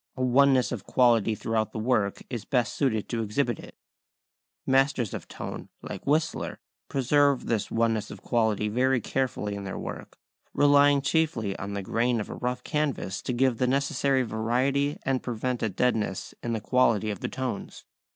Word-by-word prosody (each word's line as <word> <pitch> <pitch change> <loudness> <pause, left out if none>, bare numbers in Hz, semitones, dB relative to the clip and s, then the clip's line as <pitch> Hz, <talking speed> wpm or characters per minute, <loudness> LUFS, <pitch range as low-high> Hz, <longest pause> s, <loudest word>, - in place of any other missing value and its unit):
A 130 - -1
oneness 130 0 +4
of 115 -6 -4
quality 115 -2 +3
throughout 110 +1 -1
the - - -5
work 110 -3 0
is 120 -4 -5
best 125 -1 0
suited 110 -7 0
to 115 -2 -1
exhibit 120 +2 -1
it. - - -12 0.9
Masters 135 -4 +2
of - - -6
tone, - - -7
like - - -7
Whistler, 155 +3 0 0.3
preserve 140 +1 +2
this 115 -3 -1
oneness 115 -2 0
of - - -10
quality 110 -3 +1
very 125 +4 +2
carefully 115 -3 -2
in 100 0 -5
their 95 - -5
work, - - -7 0.4
relying 145 -1 +5
chiefly 140 -11 0
on 100 +1 -5
the 100 - -3
grain 120 +4 +1
of 105 - -5
a - - -4
rough 125 0 -3
canvas 145 -10 -2
to - - -3
give 125 -1 +1
the 125 - +2
necessary 135 0 +1
variety 130 +6 0
and 135 -1 +1
prevent 125 +1 -3
a 110 - +1
deadness 105 -2 -1
in 120 - -2
the 110 - -2
quality 115 -4 +2
of 100 - -5
the - - -3
tones. 130 -5 -5
125 Hz, 170 wpm, -27 LUFS, 110-135 Hz, 0.9 s, relying